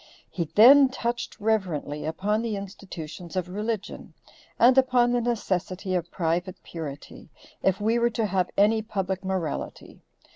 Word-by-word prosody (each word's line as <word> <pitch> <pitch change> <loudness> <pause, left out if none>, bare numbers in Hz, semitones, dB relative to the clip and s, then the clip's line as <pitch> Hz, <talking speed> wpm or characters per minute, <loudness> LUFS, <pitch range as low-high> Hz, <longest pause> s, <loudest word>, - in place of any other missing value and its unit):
He 170 - -2
then 265 +5 +8
touched 240 -2 -4
reverently 185 -9 -1
upon 200 +7 -1
the 230 -2 -2
institutions 185 -4 -8
of 185 -1 -1
religion, 210 +2 -5 0.4
and 250 +2 +6
upon 255 -2 +4
the 245 0 +1
necessity 190 -5 -2
of 175 -2 -1
private 175 +2 -2
purity, 150 -4 -8 0.3
if 190 -1 +1
we 225 +3 +1
were 235 0 +3
to 225 -1 -1
have 185 -3 0
any 215 +2 +4
public 195 -3 -3
morality. 185 -5 -4
200 Hz, 140 wpm, -26 LUFS, 180-230 Hz, 0.4 s, then